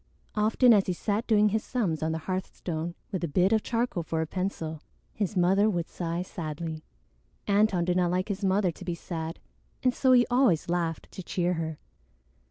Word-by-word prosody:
Often 220 Hz, +3 st, +5 dB
as 200 Hz, -3 st, +3 dB
he 185 Hz, -, +1 dB
sat 210 Hz, +5 st, -2 dB
doing 210 Hz, -2 st, +4 dB
his 220 Hz, +1 st, 0 dB
sums 190 Hz, -, -1 dB
on 160 Hz, 0 st, 0 dB
the 160 Hz, -, -1 dB
hearthstone, 175 Hz, -3 st, -3 dB, 0.2 s
with 190 Hz, -3 st, -3 dB
a -, -, +1 dB
bit 180 Hz, +7 st, +3 dB
of 220 Hz, -, +3 dB
charcoal 230 Hz, -6 st, -1 dB
for 160 Hz, 0 st, -3 dB
a -, -, 0 dB
pencil, 160 Hz, -3 st, -3 dB, 0.3 s
his 205 Hz, -1 st, -2 dB
mother 190 Hz, +4 st, +4 dB
would 175 Hz, -5 st, -1 dB
sigh 170 Hz, 0 st, -3 dB
sadly. 160 Hz, -2 st, -5 dB, 0.6 s
Antone 200 Hz, -4 st, +3 dB
did 180 Hz, 0 st, +1 dB
not 180 Hz, -1 st, +2 dB
like 185 Hz, +3 st, -1 dB
his 200 Hz, 0 st, -3 dB
mother 190 Hz, -1 st, +2 dB
to 170 Hz, -, -12 dB
be 175 Hz, -1 st, -3 dB
sad, 165 Hz, -1 st, -5 dB, 0.5 s
and 255 Hz, -1 st, +3 dB
so 260 Hz, 0 st, +3 dB
he 245 Hz, -1 st, +6 dB
always 245 Hz, -, +3 dB
laughed 170 Hz, -2 st, -2 dB
to -, -, -7 dB
cheer 180 Hz, 0 st, 0 dB
her. 160 Hz, -2 st, -3 dB
180 Hz, 190 wpm, -28 LUFS, 165-210 Hz, 0.6 s, he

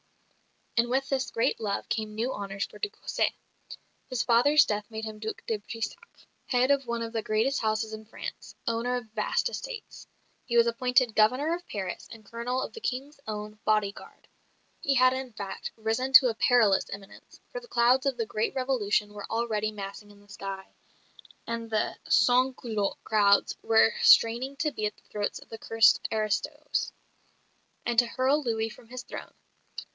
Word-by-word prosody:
And 235 Hz, +1 st, +3 dB
with 265 Hz, +2 st, 0 dB
this 265 Hz, -2 st, 0 dB
great 230 Hz, -, 0 dB
love 205 Hz, -3 st, -2 dB
came 215 Hz, -1 st, -2 dB
new 235 Hz, +4 st, -1 dB
honours 200 Hz, -1 st, -3 dB
for -, -, -14 dB
de 415 Hz, -, -1 dB
Cossé. -, -, -1 dB, 0.8 s
His 255 Hz, -2 st, 0 dB
father's 285 Hz, +5 st, +5 dB
death 210 Hz, -1 st, -3 dB
made 220 Hz, -1 st, -5 dB
him 215 Hz, -1 st, -7 dB
Duc 220 Hz, 0 st, -6 dB
de 220 Hz, -2 st, -1 dB
Brissac, 225 Hz, -, -7 dB, 0.2 s
head 255 Hz, +2 st, +3 dB
of 275 Hz, -2 st, +1 dB
one 235 Hz, 0 st, -2 dB
of 230 Hz, 0 st, -6 dB
the 225 Hz, -, -1 dB
greatest 225 Hz, +6 st, +1 dB
houses 220 Hz, 0 st, -1 dB
in 220 Hz, 0 st, -8 dB
France, 220 Hz, -, -8 dB
owner 235 Hz, +2 st, 0 dB
of 245 Hz, -2 st, -3 dB
vast 215 Hz, -, 0 dB
estates. 485 Hz, -2 st, -7 dB, 0.4 s
He 235 Hz, -, 0 dB
was 235 Hz, -, +7 dB
appointed 250 Hz, +1 st, +2 dB
Governor 255 Hz, +10 st, +3 dB
of 350 Hz, +1 st, -5 dB
Paris 190 Hz, -3 st, -5 dB
and 225 Hz, -2 st, -12 dB
Colonel 240 Hz, +4 st, -2 dB
of -, -, -6 dB
the 455 Hz, -, -8 dB
King's 280 Hz, -, -4 dB
own 210 Hz, 0 st, -5 dB
body 215 Hz, -2 st, +2 dB
guard. -, -, -15 dB, 0.5 s
He 275 Hz, -, +1 dB
had, 255 Hz, 0 st, +5 dB
in 260 Hz, -2 st, -5 dB
fact, 200 Hz, -2 st, -6 dB
risen 225 Hz, +4 st, -1 dB
to 255 Hz, -1 st, +9 dB
a -, -, -1 dB
perilous 225 Hz, -4 st, +3 dB
eminence; 200 Hz, 0 st, -11 dB
for -, -, -4 dB
the 480 Hz, -, -15 dB
clouds 250 Hz, -, +3 dB
of 265 Hz, -3 st, 0 dB
the 230 Hz, -, -1 dB
great 215 Hz, +4 st, -2 dB
Revolution 215 Hz, -6 st, 0 dB
were 205 Hz, -1 st, -8 dB
already 220 Hz, -2 st, -1 dB
massing 205 Hz, 0 st, -8 dB
in 205 Hz, 0 st, -17 dB
the 205 Hz, -, -23 dB
sky, 195 Hz, -1 st, -6 dB, 0.8 s
and 230 Hz, -1 st, -4 dB
the 220 Hz, -1 st, 0 dB
sans 250 Hz, +3 st, +4 dB
culotte 215 Hz, -4 st, -2 dB
crowds 205 Hz, -2 st, +3 dB
were 225 Hz, 0 st, +4 dB
straining 240 Hz, +4 st, +5 dB
to 300 Hz, -1 st, 0 dB
be 215 Hz, -5 st, -1 dB
at 210 Hz, -, -7 dB
the -, -, -26 dB
throats 205 Hz, -1 st, -2 dB
of -, -, -14 dB
the 225 Hz, -, -8 dB
cursed 225 Hz, -1 st, +4 dB
"aristos," 215 Hz, -2 st, -1 dB, 0.9 s
and 235 Hz, -1 st, +3 dB
to 240 Hz, -, +4 dB
hurl 260 Hz, +5 st, +1 dB
Louis 225 Hz, -4 st, -1 dB
from 225 Hz, -, -14 dB
his 250 Hz, +1 st, -7 dB
throne. -, -, -8 dB
230 Hz, 180 wpm, -28 LUFS, 215-255 Hz, 0.9 s, to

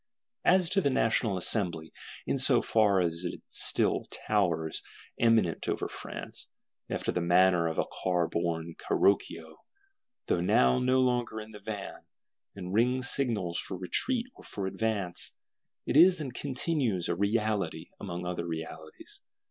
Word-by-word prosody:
As 180 Hz, -2 st, +4 dB
to 195 Hz, -, +3 dB
the 140 Hz, -, +2 dB
National 110 Hz, -5 st, +1 dB
Assembly, 85 Hz, -4 st, -2 dB, 0.3 s
in -, -, 0 dB
so -, -, +6 dB
far 105 Hz, -4 st, +3 dB
as 85 Hz, 0 st, -1 dB
it 90 Hz, -, -5 dB
still -, -, +3 dB
towers 85 Hz, -7 st, -1 dB, 0.4 s
eminent 115 Hz, -8 st, +2 dB
over -, -, -1 dB
France, -, -, -8 dB, 0.4 s
after -, -, -2 dB
the 90 Hz, -, -1 dB
manner 90 Hz, 0 st, +4 dB
of 80 Hz, -, -3 dB
a -, -, +1 dB
car 90 Hz, -2 st, -1 dB
borne 85 Hz, 0 st, -2 dB
Carroccio, 80 Hz, -5 st, 0 dB, 0.7 s
though 85 Hz, -, 0 dB
now 65 Hz, -7 st, +3 dB
no 130 Hz, +1 st, +2 dB
longer 120 Hz, -3 st, 0 dB
in 110 Hz, 0 st, -9 dB
the 105 Hz, -, -11 dB
van; 105 Hz, -2 st, -6 dB, 0.5 s
and 90 Hz, -2 st, -6 dB
rings 125 Hz, +3 st, +2 dB
signals 105 Hz, -11 st, -1 dB
for 95 Hz, -, -6 dB
retreat 230 Hz, -, 0 dB
or -, -, -16 dB
for 100 Hz, -, -5 dB
advance,—it 100 Hz, +3 st, -4 dB
is 175 Hz, +3 st, +7 dB
and 135 Hz, -5 st, -5 dB
continues 130 Hz, -, -1 dB
a -, -, 0 dB
reality 105 Hz, +2 st, -1 dB
among 90 Hz, -2 st, -5 dB
other 90 Hz, -1 st, -3 dB
realities. 80 Hz, -1 st, -8 dB
100 Hz, 140 wpm, -29 LUFS, 85-115 Hz, 0.7 s, is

